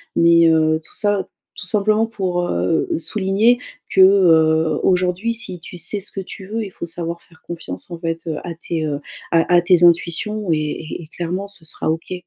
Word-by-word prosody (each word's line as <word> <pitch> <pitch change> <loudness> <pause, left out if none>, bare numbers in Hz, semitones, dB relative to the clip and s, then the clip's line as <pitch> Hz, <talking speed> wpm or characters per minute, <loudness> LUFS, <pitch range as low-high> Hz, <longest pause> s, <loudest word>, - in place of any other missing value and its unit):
mais, 170 0 +5
heu, 160 -1 +3
tout - - -11
ça, 205 -2 0 0.3
tout - - -7
simplement 215 +2 +2
pour, 180 -5 -2
heu, 90 +2 0
souligner 195 +7 +2 0.3
que, 190 - +5
heu, 160 -5 +5
aujourd'hui 185 +4 +1
si 220 -6 -5
tu 180 - -11
sais 205 +4 -2
ce 200 - -9
que 195 - -5
tu 190 0 -10
veux, 225 +2 -3
il 200 - -7
faut 170 - -6
savoir 170 0 -5
faire 160 - -23
confiance, 165 - -7
en 170 - -5
fait, 165 -1 -2 0.2
à 175 - -5
tes, 160 -1 -3
heu, 145 -2 -2 0.3
à 165 +1 +3
à 175 - +6
tes 175 0 +4
intuitions 175 +4 +2
et 160 - +3 0.5
et - - -13
clairement 180 +3 -3
ce 185 -5 -8
sera 160 - -2
OK. 165 +3 -4
175 Hz, 190 wpm, -20 LUFS, 165-195 Hz, 0.5 s, à